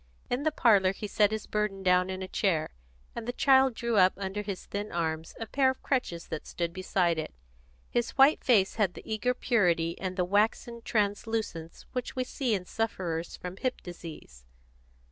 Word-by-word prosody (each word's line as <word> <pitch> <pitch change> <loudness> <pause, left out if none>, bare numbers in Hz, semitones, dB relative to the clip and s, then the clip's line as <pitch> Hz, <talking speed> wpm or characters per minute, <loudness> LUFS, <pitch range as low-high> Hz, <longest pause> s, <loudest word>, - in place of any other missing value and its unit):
In 245 +2 +1
the 310 +1 +1
parlour 200 -9 +4
he 210 - -6
set 210 0 +3
his 220 0 -4
burden 210 -2 -2
down 180 0 +3
in 190 0 -4
a - - -5
chair, 170 -5 0 0.4
and 235 -1 -5
the - - 0
child 265 -1 +4
drew 235 -1 -1
up 185 -1 +6
under 195 +1 -3
his 200 -2 -5
thin 205 +1 -4
arms 160 -1 -2
a 225 - -3
pair 265 +3 +2
of 260 - -4
crutches 180 -11 -1
that 160 - -5
stood 170 -1 -3
beside 180 -2 +1
it. 155 - -4 0.6
His 240 -1 0
white 275 +3 +6
face 210 -6 +3
had 195 -5 +1
the - - -9
eager 225 +3 0
purity 175 -10 +2
and 185 -1 -3
the 180 - +2
waxen 220 +4 +1
translucence 205 -6 -2
which 250 -1 -4
we 255 - 0
see 250 -3 -1
in 185 -2 -4
sufferers 175 -7 -3
from 180 +1 -7
hip 255 +3 -2
disease. 165 - -10
200 Hz, 185 wpm, -29 LUFS, 180-235 Hz, 0.6 s, up